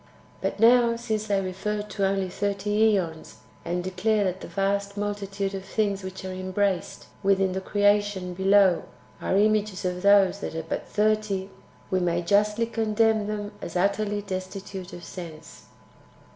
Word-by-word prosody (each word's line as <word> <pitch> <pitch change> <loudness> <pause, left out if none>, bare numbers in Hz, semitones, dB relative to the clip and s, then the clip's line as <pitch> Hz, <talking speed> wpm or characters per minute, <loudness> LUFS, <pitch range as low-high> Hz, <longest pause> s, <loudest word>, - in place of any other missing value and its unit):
But - - -2
now, 235 +1 +6
since 220 -2 -3
they 200 -2 +2
refer 195 +3 -3
to 205 -2 -1
only 195 -1 0
thirty 205 +3 +1
^ons, 165 -5 -3 0.3
and 175 +1 -2
declare 200 +4 +1
that 185 -1 -2
the - - -7
vast 200 +1 -1
multitude 200 -1 -3
of 190 -1 -5
things 200 -1 -1
which 190 0 -7
are 185 - -4
embraced 185 -1 -1 0.2
within 195 -1 +2
the 190 +1 -3
creation 205 -2 +1
[below] 190 -1 +4 0.4
are 190 - +1
images 210 -2 +2
of 180 0 -2
those 200 -1 +5
that 160 - -5
are 160 - -3
but 165 - -4
thirty, 210 -2 0 0.4
we 185 - +2
may 175 -1 0
justly 210 +5 +2
condemn 220 -1 +1
them 210 -1 -4
as 170 - -7
utterly 205 +2 0
destitute 190 -1 -6
of 175 - -9
sense. 165 -3 -10
200 Hz, 155 wpm, -26 LUFS, 185-210 Hz, 0.4 s, now